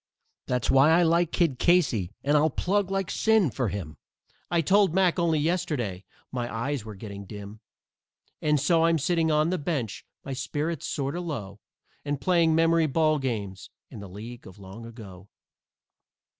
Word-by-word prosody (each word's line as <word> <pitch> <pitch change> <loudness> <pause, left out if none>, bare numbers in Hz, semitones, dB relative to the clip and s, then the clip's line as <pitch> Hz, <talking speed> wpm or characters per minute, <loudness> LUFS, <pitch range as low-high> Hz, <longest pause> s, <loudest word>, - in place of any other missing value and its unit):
That's 125 -1 0
why 135 +3 +6
I 170 +2 +5
like 170 0 +2
Kid 160 -8 +1
Casey, 140 - +2
and 145 +2 +2
I'll 150 +2 +4
plug 190 +6 0
like 195 -2 -2
sin 220 - +3
for 120 0 -1
him, 80 -7 -6 0.5
I 170 -1 +2
told 190 +1 +3
Mack 185 -2 +3
only 165 -2 +2
yesterday 150 - -1 0.3
my 120 -2 -3
eyes 125 +2 -2
were 110 -1 -9
getting 100 0 -8
dim. 105 +1 -9 0.8
And 150 -1 +2
so 165 +3 +3
I'm 165 0 +3
sitting 165 +2 +1
on 155 +2 +2
the 185 - -1
bench, 140 - -3 0.2
my 135 - -4
spirits 145 +4 -3
sort 140 -1 -2
o' - - -2
low, 105 - -6 0.4
And 145 -1 -2
playing 165 0 +3
memory 165 0 +3
ball 155 +1 +2
games 100 -7 -4 0.2
in 120 - -9
the 100 -1 -9
League 115 +6 -9
of 95 - -13
Long 100 +4 -10
Ago. 100 -5 -12
145 Hz, 170 wpm, -26 LUFS, 110-165 Hz, 0.8 s, why